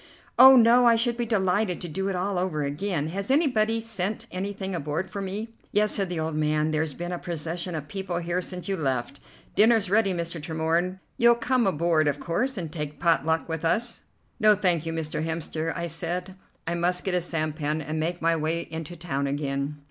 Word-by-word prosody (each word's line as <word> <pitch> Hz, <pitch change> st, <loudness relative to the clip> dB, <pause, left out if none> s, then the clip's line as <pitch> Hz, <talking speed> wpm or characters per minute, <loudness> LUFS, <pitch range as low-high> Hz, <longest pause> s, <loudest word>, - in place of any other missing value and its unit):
"Oh, 265 Hz, +1 st, +11 dB
no! 240 Hz, 0 st, +6 dB
I 230 Hz, -, +6 dB
should 235 Hz, +1 st, +1 dB
be 240 Hz, -1 st, -2 dB
delighted 190 Hz, -3 st, +1 dB
to 175 Hz, -, -4 dB
do 190 Hz, +5 st, -3 dB
it 195 Hz, -, -1 dB
all 185 Hz, +1 st, -1 dB
over 170 Hz, -5 st, -1 dB
again! 150 Hz, +2 st, -2 dB
Has 195 Hz, +5 st, -4 dB
anybody 230 Hz, -7 st, +2 dB
sent 215 Hz, -2 st, -3 dB
anything 195 Hz, +1 st, -4 dB
aboard 160 Hz, +3 st, -3 dB
for 200 Hz, -, -4 dB
me?" 210 Hz, +4 st, -5 dB, 0.2 s
"Yes," 210 Hz, +1 st, +2 dB
said 195 Hz, -3 st, 0 dB
the 175 Hz, -2 st, -3 dB
old 160 Hz, 0 st, -2 dB
man, 155 Hz, 0 st, +1 dB
"there's 155 Hz, -2 st, -1 dB
been 175 Hz, +1 st, -5 dB
a 175 Hz, -, -3 dB
procession 170 Hz, +1 st, -4 dB
of 150 Hz, -2 st, -5 dB
people 190 Hz, -2 st, -4 dB
here 175 Hz, +1 st, -1 dB
since 180 Hz, 0 st, -6 dB
you 195 Hz, -, 0 dB
left. 130 Hz, -6 st, -2 dB, 0.3 s
Dinner's 220 Hz, -3 st, +4 dB
ready, 210 Hz, -2 st, +3 dB
Mr. 170 Hz, -2 st, -3 dB
Tremorne. 165 Hz, +4 st, -1 dB, 0.2 s
You'll 235 Hz, 0 st, +6 dB
come 240 Hz, -1 st, +1 dB
aboard, 165 Hz, -3 st, +2 dB
of 145 Hz, 0 st, 0 dB
course, 235 Hz, +10 st, -1 dB
and 165 Hz, -4 st, -4 dB
take 150 Hz, -2 st, -5 dB
pot 165 Hz, -3 st, +2 dB
luck 160 Hz, 0 st, +1 dB
with 160 Hz, -1 st, -4 dB
us?" 230 Hz, +8 st, +1 dB, 0.4 s
"No, 215 Hz, -2 st, +6 dB
thank 175 Hz, -5 st, 0 dB
you, -, -, -1 dB
Mr. 160 Hz, -1 st, -3 dB
Hemster," 160 Hz, 0 st, -2 dB
I 170 Hz, -, -2 dB
said; 175 Hz, +3 st, -3 dB, 0.3 s
"I 165 Hz, -, -1 dB
must 175 Hz, +1 st, +1 dB
get 190 Hz, -, -1 dB
a 180 Hz, -, +2 dB
sampan 155 Hz, -2 st, -2 dB
and 155 Hz, +1 st, -3 dB
make 170 Hz, +2 st, -2 dB
my 165 Hz, 0 st, +3 dB
way 160 Hz, +1 st, -1 dB
into 160 Hz, +1 st, -6 dB
town 145 Hz, -5 st, -2 dB
again." 140 Hz, +1 st, -2 dB
175 Hz, 205 wpm, -26 LUFS, 160-200 Hz, 0.4 s, Oh